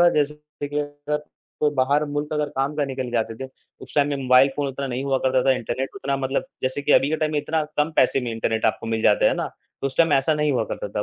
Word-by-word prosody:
जैसे 150 0 +1
कि 150 -1 -8
देखिए 145 +1 -2
अगर 145 +1 -4 0.4
कोई 150 - +3
बाहर 140 +3 +2
मुल्क 145 +1 -3
अगर 150 -1 0
काम 135 +2 0
निकल 130 -2 -4
जाते 115 -1 -1
थे - - -8 0.3
उस - - -10
टाइम 145 -1 +3
में 145 - -1
मोबाइल 130 0 +5
फ़ोन 145 -1 0
उतना 135 +1 -4
नहीं 130 +1 -3
हुआ 135 -1 +1
करता 130 0 +2
था, 135 - +4
इंटरनेट 130 +1 -3
उतना 140 -8 -2
मतलब 135 0 -1 0.2
जैसे 130 +2 -1
कि 145 - +2
अभी 135 - +5
के 160 - +1
टाइम 155 0 -1
में 150 - +1
इतना 155 +2 0
कम 150 +2 +2
पैसे 135 - +4
में 125 -2 -3
इंटरनेट 110 0 -1
आपको - - -1
मिल 115 -1 -1
जाता 105 - +4
है - - +3
ना, - - -2 0.3
तो - - 0
उस 135 - -5
टाइम 165 0 +4
ऐसा 135 +3 +3
नहीं 150 0 +1
हुआ 125 -4 +1
करता 105 - -4
था। 105 +1 -2
140 Hz, 265 wpm, -23 LUFS, 130-150 Hz, 0.4 s, मोबाइल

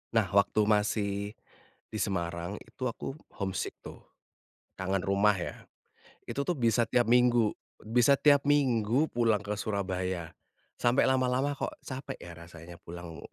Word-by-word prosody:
Nah 110 -4 +4
waktu 100 +2 +3
masih 105 -1 0 0.6
di 110 - -4
Semarang, 85 0 -2
itu 130 - -7
aku 135 +4 -6 0.2
homesick 95 -1 -2
tuh, - - -9 0.8
kangen 95 0 0
rumah 100 +2 +4
ya. 85 - -6 0.6
Itu 140 - -2
tuh 175 - +1
bisa 115 -1 +2
tiap 120 -2 +2
minggu 120 -3 +4 0.3
bisa 120 +5 +4
tiap 145 -2 +5
minggu 130 -1 +2
pulang 115 -3 +2
ke 105 +1 -3
Surabaya. 95 -4 -2 0.5
Sampai 120 +2 +3
lama-lama 130 +2 +2
kok - - -4
capek 135 +1 -6
ya, 85 - -9
rasanya 85 0 -11
pulang 85 -1 -9
105 Hz, 135 wpm, -30 LUFS, 95-125 Hz, 0.8 s, tiap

